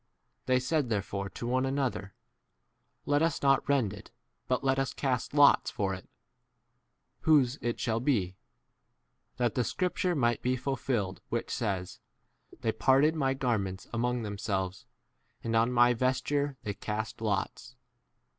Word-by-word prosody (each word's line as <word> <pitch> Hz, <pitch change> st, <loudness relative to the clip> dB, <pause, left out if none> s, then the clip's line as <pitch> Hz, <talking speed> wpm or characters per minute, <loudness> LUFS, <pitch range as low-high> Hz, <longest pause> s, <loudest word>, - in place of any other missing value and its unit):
They 130 Hz, 0 st, +4 dB
said 140 Hz, 0 st, 0 dB
therefore 100 Hz, -2 st, -2 dB
to 120 Hz, -, -7 dB
one 130 Hz, +2 st, +1 dB
another, 135 Hz, -8 st, -2 dB, 0.9 s
Let 145 Hz, +1 st, +2 dB
us 165 Hz, -3 st, 0 dB
not 135 Hz, -1 st, +3 dB
rend 130 Hz, -8 st, +2 dB
it, 100 Hz, -, -11 dB, 0.4 s
but 130 Hz, +1 st, 0 dB
let 135 Hz, 0 st, +2 dB
us 135 Hz, -1 st, -1 dB
cast 130 Hz, 0 st, -1 dB
lots 145 Hz, -1 st, +6 dB
for 95 Hz, -2 st, -1 dB
it, 95 Hz, -, -9 dB, 1.1 s
whose 145 Hz, -4 st, +3 dB
it 120 Hz, 0 st, -2 dB
shall 115 Hz, -2 st, 0 dB
be; 105 Hz, -9 st, 0 dB, 1.0 s
that 120 Hz, -2 st, +1 dB
the 125 Hz, -, +1 dB
scripture 180 Hz, +4 st, -1 dB
might 120 Hz, -5 st, +1 dB
be 125 Hz, +1 st, +1 dB
fulfilled 125 Hz, -7 st, -2 dB
which -, -, -2 dB
says, 95 Hz, -5 st, -2 dB, 0.6 s
They 115 Hz, -, +1 dB
parted 135 Hz, +8 st, +4 dB
my 135 Hz, -4 st, 0 dB
garments 105 Hz, -8 st, -1 dB
among 120 Hz, 0 st, 0 dB
themselves, 95 Hz, -3 st, -3 dB, 0.6 s
and 115 Hz, 0 st, -1 dB
on 115 Hz, +2 st, +3 dB
my 120 Hz, 0 st, +5 dB
vesture 130 Hz, +3 st, 0 dB
they 105 Hz, -, -3 dB
cast 110 Hz, +2 st, -4 dB
lots. 110 Hz, +3 st, -2 dB
125 Hz, 140 wpm, -30 LUFS, 105-135 Hz, 1.1 s, lots